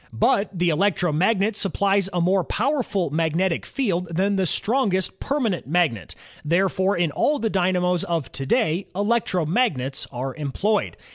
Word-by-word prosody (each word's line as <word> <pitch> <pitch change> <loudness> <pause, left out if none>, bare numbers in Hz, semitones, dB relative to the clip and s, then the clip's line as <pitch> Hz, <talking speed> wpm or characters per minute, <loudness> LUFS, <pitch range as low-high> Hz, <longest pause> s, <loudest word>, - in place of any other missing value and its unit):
But 160 - +1
the 175 -2 0
electromagnet 190 +4 +1
supplies 195 -1 +1
a 180 - -1
more 185 +2 +2
powerful 215 - -1
magnetic 165 +3 0
field 180 -10 -1
than 190 +4 0
the 190 -2 +1
strongest 200 - 0
permanent 245 - -1
magnet; 155 - 0 0.3
therefore 190 +4 +1
in 170 -3 +1
all 295 - +1
the 225 -5 -2
dynamos 180 -1 +1
of 165 -7 -2
to 135 - -4
day, 195 - +1
electromagnets 185 - 0
are 130 +1 -4
employed. 165 +8 -1
185 Hz, 135 wpm, -23 LUFS, 165-205 Hz, 0.3 s, more